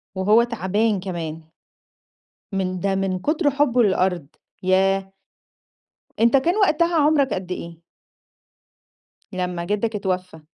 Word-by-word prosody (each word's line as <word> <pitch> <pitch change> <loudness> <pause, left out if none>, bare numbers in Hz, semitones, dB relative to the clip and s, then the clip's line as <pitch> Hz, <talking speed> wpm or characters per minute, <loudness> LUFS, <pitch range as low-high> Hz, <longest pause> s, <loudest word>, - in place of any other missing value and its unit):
وهو 210 +5 +4
تَعبان 210 -2 0
كمان. 165 -4 -5 1.1
من 185 -1 -2
ده 195 +2 0
من 190 -1 -1
كتر 300 - +1
حُبّه 275 -4 +2
لللأرض. 185 -6 +1 0.4
ياه! 195 +1 +1 1.1
أنت 235 +4 +5
كان 345 +9 +1
وقتها 340 -4 +2
عُمرك 295 -3 +3
قد 185 -1 -5
إيه؟ 170 -2 -7 1.5
لمّا 180 -2 -3
جدّك 210 +3 -1
اتوفّى. 185 -4 -3
195 Hz, 110 wpm, -22 LUFS, 185-240 Hz, 1.5 s, أنت